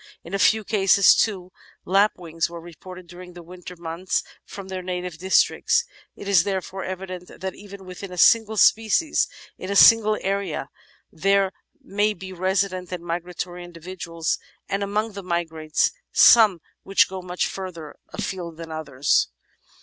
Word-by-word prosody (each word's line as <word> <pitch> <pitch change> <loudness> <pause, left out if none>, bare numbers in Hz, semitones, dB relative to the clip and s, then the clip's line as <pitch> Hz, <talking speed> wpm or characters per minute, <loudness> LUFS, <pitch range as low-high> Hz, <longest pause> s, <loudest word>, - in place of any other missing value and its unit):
In 170 - -11
a 195 - 0
few 220 +2 +4
cases, 200 -2 +5
too, 185 -4 -1 0.3
lapwings 180 -5 +1
were 170 0 -8
reported 180 +2 -12
during 180 +1 -12
the 175 0 -11
winter 180 +1 -11
months 170 +2 -3 0.2
from 195 -1 -10
their 190 -1 -5
native 180 -2 -5
districts. 190 - +2 0.3
It - - -10
is 190 -5 +5
therefore 190 -1 -4
evident 185 -1 -7
that 190 0 -4
even 200 -1 -12
within 185 +1 -9
a 180 - -8
single 220 +3 +4
species, 225 +10 +3 0.3
in 185 - -6
a 200 - -1
single 215 0 +7
area, 195 -7 -2 0.4
there 195 +3 +2 0.3
may 210 +2 -1
be 190 +2 -9
resident 185 0 -1
and 180 -2 -5
migra 175 +1 -5
tory 175 0 -5
individuals, 170 -1 -4 0.3
and, 195 - -2
among 210 +2 -1
the 200 -1 -8
migrants, 160 -4 -1 0.2
some 210 -7 +6 0.2
which 195 - +3
go 190 0 -7
much 180 0 -2
further 175 -5 -7 0.2
afield 170 -4 -5
than 165 -1 -8
others. 145 -3 0
185 Hz, 150 wpm, -23 LUFS, 175-195 Hz, 0.4 s, single